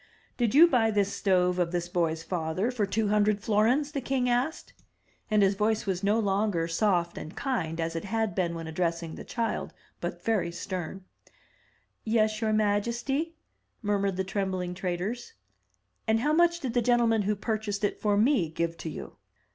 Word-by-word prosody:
"Did 240 0 0
you 320 +4 +10
buy 240 -8 +3
this 205 -2 +1
stove 180 -2 +2
of 170 -1 +1
this 175 -1 -1
boy's 165 -2 -1
father 180 +6 -1
for 220 -5 -1
two 215 +1 0
hundred 210 0 +3
florins?" 230 +8 +2
the 280 -3 -3
king 255 0 0
asked; 250 +6 -1 0.6
and 210 -2 +4
his 195 0 +4
voice 215 +2 0
was 190 -1 -2
no 205 +2 +3
longer 195 -4 +1
soft 170 -1 +1
and 155 - -8
kind 170 - -2
as 165 0 -2
it 165 - -3
had 220 +1 -1
been 170 -3 -1
when 165 0 -5
addressing 165 0 -2
the - - -8
child, 230 -1 -3 0.2
but - - -5
very 215 -6 +1
stem. 185 +1 -5 1.0
"Yes, 215 -1 +1
your 220 -1 +1
majesty," 235 +9 0 0.5
murmured 200 -2 0
the 190 - 0
trembling 185 -2 -2
traders. 190 - -3 0.7
"And 220 +1 +3
how 295 +4 +2
much 340 +1 +4
did 255 -6 -3
the 245 - +2
gentleman 235 -2 +3
who 210 +1 0
purchased 210 -1 -3
it 205 - -1
for 205 -1 +2
me 215 - +3
give 165 +1 -2
to 165 - -5
you?" - - -8
205 Hz, 175 wpm, -28 LUFS, 180-230 Hz, 1.0 s, you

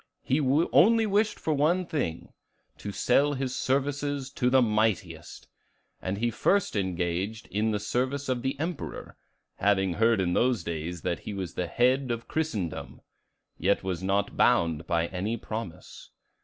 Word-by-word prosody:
He 135 - +1
only 170 - +4
wished 210 +1 +1
for 155 - 0
one 165 +6 +2
thing: 130 - -3 0.5
to 100 - -5
sell 140 +8 +2
his 130 -2 -3
services 140 0 -1
to 125 -3 +1
the 130 +1 +5
mightiest. 105 -8 -1 0.5
And 95 +1 -2
he 120 +2 0
first 195 - +1
engaged 95 +2 -2
in 105 +2 +1
the 105 -1 0
service 130 +6 -1
of 125 -2 -1
the 135 +2 -2
Emperor, 165 +1 -5 0.4
having 95 -2 +2
heard 115 +2 +3
in 90 -2 +1
those 120 -5 +2
days 85 +1 -4
that 85 - -1
he 105 - -6
was 95 -3 -4
the 90 - -2
head 125 +7 +2
of 115 -1 -3
Christendom, 110 - -3 0.6
yet 100 +4 +2
was 95 -2 -3
not 100 +1 0
bound 85 -1 +2
by 85 -1 +1
any 100 +5 -2
promise. 110 -6 -7
110 Hz, 155 wpm, -28 LUFS, 95-140 Hz, 0.6 s, the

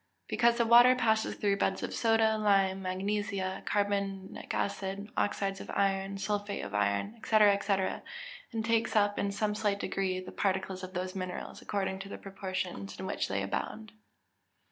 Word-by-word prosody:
_ - - -43 0.2
Because 235 -1 +3
the 235 - +3
water 240 +2 +8
passes 220 -3 +1
through 200 -1 +1
beds 190 -1 0
of - - -3
soda, 225 -1 +3
lime, 195 -2 +2
magnesia, 190 0 -2
carbonic 200 -2 -1
acid, 200 +1 -3
oxides 195 -1 -1
of - - -10
iron, 195 0 +1
sulphate 205 0 -2
of 100 - -8
iron, 105 - 0
&c., - - -8
&c., 205 -2 +4 0.8
and 225 -2 -2
takes 230 -1 +1
up 205 -1 +3
in 200 - 0
some 210 +1 0
slight 210 -2 0
degree 190 -2 -1
the 185 - -8
particles 190 -1 -1
of 185 0 -8
those 185 +1 -2
minerals, 185 -2 -5
according 190 -2 -2
to 195 0 -7
the - - -6
proportions 185 - -5
in - - -4
which 190 - -1
they 100 0 -1
abound. 215 - -4
200 Hz, 165 wpm, -31 LUFS, 190-210 Hz, 0.8 s, water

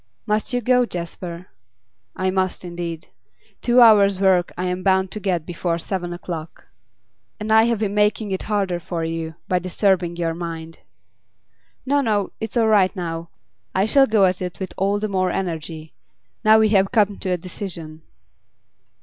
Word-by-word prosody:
Must 210 +3 0
you 245 0 0
go, 250 +2 +3
Jasper?' 170 -1 -6 0.7
'I 185 0 0
must 185 -1 -1
indeed. 170 -1 -6 0.5
Two 245 +1 +4
hours' 200 -4 +6
work 185 -3 +3
I 180 - -2
am 180 0 -2
bound 190 0 +2
to 215 - -5
get 180 -6 -1
before 170 -1 -2
seven 175 0 -4
o'clock.' 170 -2 -7 0.7
'And 215 +1 -1
I 220 0 +6
have 235 -1 +1
been 205 -1 -2
making 210 0 +1
it 190 - -2
harder 195 -4 0
for 170 -1 -4
you, 165 -1 -4
by 180 - +1
disturbing 180 -1 0
your 170 -1 -1
mind.' 165 -1 -7 1.1
'No, 285 +2 +2
no; 210 -6 0
it's 220 +2 -4
all 225 -1 +3
right 205 -2 +3
now. 165 -2 -4 0.5
I 190 +1 +3
shall 270 +5 +5
go 215 -3 +4
at 185 0 0
it 180 0 -5
with 190 -2 -5
all 200 +2 +1
the 215 +1 -2
more 185 -2 0
energy, 160 -3 -4 0.5
now 215 0 +7
we 220 0 +4
have 195 -2 +3
come 210 -4 +2
to 190 - -3
a 180 - +1
decision. 165 -3 -7
185 Hz, 170 wpm, -22 LUFS, 175-210 Hz, 1.1 s, now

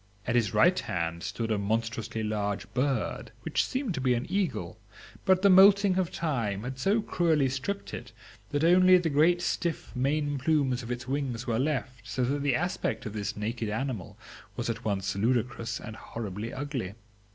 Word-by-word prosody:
At 120 - 0
his 115 -5 +2
right 180 +1 +4
hand 85 -1 -3
stood 110 +3 -3
a 105 - +1
monstrously 115 +1 -2
large 105 -2 -2
bird, 130 -3 -1
which - - +1
seemed 260 -6 -2
to 135 - -3
be 125 -1 +3
an 120 - -2
eagle; 160 - -1 0.5
but 190 0 +4
the 200 - +7
moulting 195 0 +7
of 180 -3 0
time 115 -11 -2
had 130 +1 -5
so 205 - +2
cruelly 160 -8 +2
stripped 135 +10 -4
it - - -7 0.4
that 145 +1 -1
only 185 +2 +7
the 170 -3 0
great 170 +5 +4
stiff 170 -5 -2
main 145 +2 0
plumes 135 -3 +1
of 115 - -8
its 125 0 -4
wings 130 -3 -2
were 115 -2 0
left, 130 -4 -2
so 125 +4 -1
that 140 +3 0
the 140 -3 +2
aspect 175 -5 -2
of 105 - -5
this 105 -2 -3
naked 110 +1 -3
animal 115 -3 -4 0.4
was - - -1
at 115 +1 -7
once 100 -2 -1
ludicrous 115 +1 0
and 110 0 -8
horribly 110 0 -6
ugly. 130 -9 -4
125 Hz, 180 wpm, -28 LUFS, 110-155 Hz, 0.5 s, the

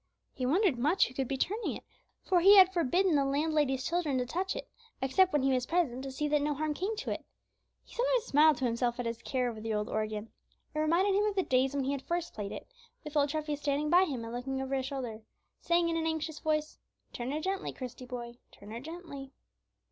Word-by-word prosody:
He 255 -2 -2
wondered 335 - +2
much 300 +10 +3
who 245 - -11
could 265 0 -2
be 270 - -2
turning 420 - -1
it, - - -15 0.4
for 365 -2 +3
he 395 +4 +8
had 375 -1 +8
forbidden 350 +2 +2
the 285 -2 +4
landlady's 285 -1 +1
children 335 -6 0
to 250 - 0
touch 370 +9 -2
it, - - -6 0.3
except 350 +8 +3
when 295 -3 +1
he 270 - +3
was 255 -1 0
present 310 -8 0
to 270 0 -5
see 295 +3 -2
that 295 0 +2
no 295 0 0
harm 305 +1 -1
came 385 +8 -2
to 445 - -4
it. - - -4 0.6
He - - -18
sometimes - - +1
smiled 305 - +5
to 255 - -1
himself 240 +1 0
at 245 - -2
his 230 0 -3
care 255 -2 -1
over 225 -3 -5
the 220 0 -2
old 210 0 -2
organ. 215 0 -3 0.4
It 305 - -2
reminded 340 +6 +3
him 410 +2 +3
of 420 -2 0
the 380 - +2
days 260 0 +2
when 280 - 0
he 270 - 0
had 280 -2 -2
first 345 +3 -3
played 205 -2 -5
it, - - -7 0.4
with 300 -1 -8
old 290 -1 +3
Treffy 305 0 -2
standing 290 +1 -1
by 360 +2 +6
him 265 -9 -4
and 230 +1 -6
looking 265 +2 -3
over 265 0 -3
his 265 -1 0
shoulder, 250 -6 -5 0.4
saying 340 0 +2
in 335 - 0
an 325 0 0
anxious 315 -1 -2
voice, 305 -1 -1 0.3
"Turn 240 +1 -4
her 300 - -1
gently, 385 +4 -2
Christie, 255 -1 -8
boy; 240 -1 -7
turn 205 +1 -13
her 230 - -5
gently." 285 -2 -8
290 Hz, 240 wpm, -31 LUFS, 255-340 Hz, 0.6 s, he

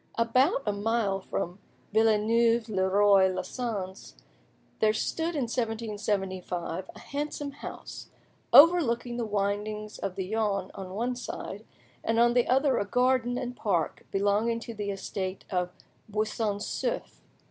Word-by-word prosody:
About 255 +6 +3
a 210 - +1
mile 205 -1 0
from 180 -1 -4 0.3
Villeneuve 225 +1 +3
le 190 -2 +1
Roi 200 -1 +5
les 185 0 -4
Sens, 190 - -5 0.6
there 215 0 +4
stood 325 +9 -1
in 285 - 0
1775 205 -6 -2
a - - -11
handsome 290 0 -4
house, 280 - -8 0.4
overlooking 255 -7 +6
the 235 - -1
windings 210 +1 -2
of 195 -2 -3
the 190 - -2
Yonne 205 -2 -1
on 190 -1 -7
one 245 +4 -1
side, 245 - -6 0.4
and 225 - +1
on 240 0 +5
the 245 -1 +3
other 265 +2 +3
a - - -1
garden 250 +2 +2
and 250 -1 -4
park 175 -10 -1
belonging 205 +4 +1
to 230 0 -7
the 205 -2 -4
estate 195 -1 -4
of 180 -1 0 0.4
Buisson 215 0 -1
Souef. - - -3
215 Hz, 135 wpm, -28 LUFS, 195-240 Hz, 0.6 s, overlooking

